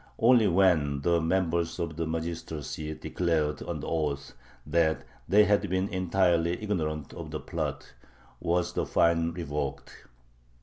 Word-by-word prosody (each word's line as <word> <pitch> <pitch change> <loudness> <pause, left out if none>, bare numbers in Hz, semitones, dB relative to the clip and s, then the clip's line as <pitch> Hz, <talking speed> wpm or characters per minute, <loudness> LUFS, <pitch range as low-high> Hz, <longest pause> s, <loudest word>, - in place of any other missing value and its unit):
Only 115 -2 +5
when 85 -7 +3
the 85 +3 +2
members 85 -1 0
of 85 -2 -3
the 80 0 -2
magistracy 80 -2 -4
declared 80 -4 -1
under - - -4
oath 75 -4 -2 0.3
that 80 +1 +1 0.3
they 105 +2 +7
had 100 -1 +2
been 95 +2 0
entirely 90 -3 +2
ignorant 80 -8 -2
of - - -7
the - - -4
plot - - -4 0.5
was 90 +1 0
the - - -1
fine 85 0 +3
revoked. 75 -5 -5
85 Hz, 130 wpm, -28 LUFS, 80-90 Hz, 0.5 s, they